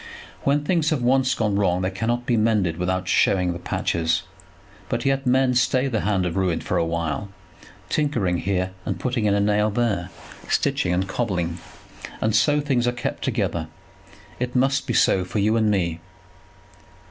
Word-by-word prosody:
When 145 +1 +2
things 165 -1 +1
have 150 -7 -1
once 130 0 +3
gone 105 -3 0
wrong 90 -2 +1
they 95 - 0
cannot 120 +5 -2
be 120 -2 +1
mended 105 -7 +1
without 90 +1 -1
showing 90 -2 +2
the 85 - -7
patches. 80 -1 -1 0.7
But - - -2
yet 135 -1 +1
men 130 0 +3
stay 130 +1 +2
the 115 -5 -1
hand 95 -2 0
of 90 - -2
ruin 95 -4 +1
for - - -2
a - - +2
while, 85 +3 -2 0.6
tinkering 120 - 0
here 95 -1 -1
and - - -3
putting 125 -4 -1
in 100 -1 +3
a - - +2
nail 105 +1 +2
there, 100 -5 -1 0.4
stitching - - +1
and 95 +2 0
cobbling; 90 -6 -2 0.6
and 110 0 +1
so 145 +8 +3
things 130 -4 0
are - - +3
kept 120 - -4
together. 80 -1 -1 0.7
It 125 0 -3
must 135 +2 +2
be - - -1
so 95 - +3
for 90 +4 -5
you 105 +2 +2
and 110 -2 +2
me. 85 -5 0
105 Hz, 175 wpm, -23 LUFS, 90-125 Hz, 0.7 s, once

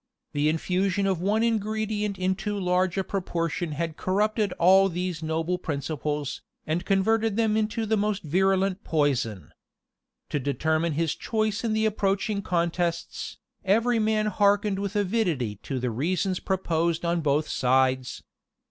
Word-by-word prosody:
The 145 +1 +2
infusion 185 +4 0
of 190 -3 0
one 210 +4 +2
ingredient 215 -2 -1
in 185 0 +1
too 205 +1 -3
large 180 0 +1
a 195 - +1
proportion 175 -4 -2
had 165 +1 -3
corrupted 210 +1 +1
all 190 +3 +5
these 180 -2 -3
noble 160 +3 -1
principles, 150 -1 -3 0.2
and 165 +3 -1
converted 215 +3 +2
them 220 -1 +2
into 220 +1 0
the 220 0 +1
most 205 0 -1
virulent 190 +4 +1
poison. 125 - 0 0.8
To 145 - -1
determine 155 +4 0
his 160 +1 0
choice 215 -1 -1
in 225 -2 0
the 220 0 +1
approaching 200 -1 0
contests, 170 -1 -2 0.3
every 225 +4 +2
man 215 0 +1
hearkened 205 -1 +2
with 200 +1 -3
avidity 180 - 0
to 135 +6 -5
the 125 -1 -1
reasons 180 - -1
proposed 170 -3 0
on 170 0 +1
both 150 +1 +1
sides. 130 0 +1
185 Hz, 140 wpm, -26 LUFS, 160-205 Hz, 0.8 s, all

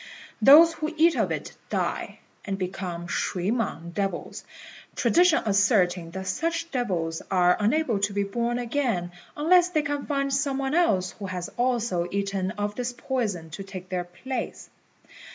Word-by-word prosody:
Those 315 +8 +8
who 310 0 -3
eat 330 +1 +5
of - - 0
it - - -4 0.2
die, - - -2 0.2
and 195 -1 -3
become 180 -2 -4
shui 180 +2 -1
mang 190 -8 -2
devils, 195 -1 -3 0.5
tradition 350 -1 +4
asserting 195 -4 +2
that 190 +2 -6
such 330 - -2
devils 175 - -2
are 180 -2 +4
unable 230 +1 +1
to 200 +1 0
be 200 0 0
born 235 +4 -1
again 235 -8 -1 0.3
unless 350 +4 +4
they 310 -4 +1
can 285 0 -3
find 275 -2 0
some 275 0 0
one 270 +1 -2
else 195 - +2
who 200 0 -7
has 180 -1 -4
also 235 -8 0
eaten 195 -1 -1
of 205 0 -2
this 245 +2 -3
poison 200 -11 -2
to 195 +5 -6
take 190 -2 -9
their 180 -1 -2
place. 240 +8 -6
205 Hz, 155 wpm, -26 LUFS, 185-275 Hz, 0.5 s, Those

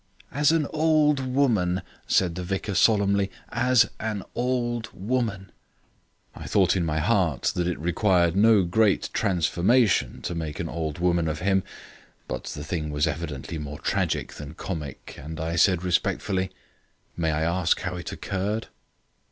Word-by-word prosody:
"As 150 +2 +3
an 165 -2 +2
old 155 -2 +3
woman," 120 -9 +1 0.2
said 90 -3 +2
the 90 +2 -5
vicar 95 +3 -3
solemnly, 100 -1 +3 0.2
"as 120 -1 +3
an 105 -3 -3
old 120 -2 -1
woman." 100 -3 -2 0.8
I - - -9
thought - - +3
in 90 - +1
my 80 -2 -1
heart 85 - +1
that 90 -1 -1
it 90 - -1
required 90 0 +2
no 105 0 +5
great 100 +4 +2
transformation 100 +4 +2
to - - -3
make 80 -3 -4
an - - -2
old 80 -2 -3
woman 85 -1 +1
of 80 +1 -3
him, 95 0 +2 0.7
but - - -5
the 75 - -6
thing 75 -1 -3
was 75 0 +1
evidently 80 0 -4
more 75 0 -6
tragic - - -1
than 75 +1 -9
comic, 80 -7 -6
and 80 +3 -7
I 80 +1 -2
said 90 0 +3
respectfully: 95 +1 0 0.7
"May 85 -2 0
I 80 0 0
ask 85 +1 +1
how - - -3
it - - -6
occurred?" 100 +4 -3
95 Hz, 150 wpm, -25 LUFS, 85-110 Hz, 0.8 s, no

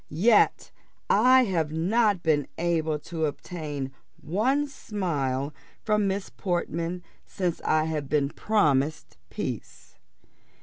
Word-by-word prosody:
yet 205 +9 +3 0.4
I 255 +5 +6
have 165 -8 0
not 200 +4 +2
been 150 -3 +2
able 160 -2 0
to 160 +1 -2
obtain 145 -3 -5 0.3
one 240 - +1
smile 150 - -2 0.3
from 210 -2 +2
Miss 195 0 -2
Portman 175 -1 -2 0.2
since 180 -3 -3
I 155 0 +2
have 155 -3 -3
been 145 -2 +2
promised 145 - 0
peace." - - -6
165 Hz, 105 wpm, -26 LUFS, 150-205 Hz, 0.4 s, I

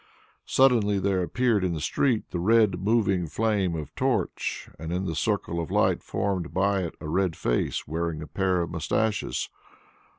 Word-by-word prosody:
Suddenly 115 -6 +4
there 95 -1 +1
appeared 115 +2 +1
in 90 -2 0
the - - -3
street 115 - 0
the 90 - -2
red 105 -1 +3
moving 100 -4 +1
flame 100 -2 0
of 75 -4 -6
torch - - -1
and 80 +1 -5
in 90 +2 -1
the 85 - -2
circle 80 +2 -1
of 80 - -5
light - - +2
formed 95 -4 -2
by 100 +1 +2
it 85 -3 -4
a - - -7
red 90 +1 0
face - - -1
wearing 80 +1 -2
a - - -9
pair 95 -2 0
of 85 - -6
moustaches. 100 +6 -1
95 Hz, 170 wpm, -26 LUFS, 85-105 Hz, -, Suddenly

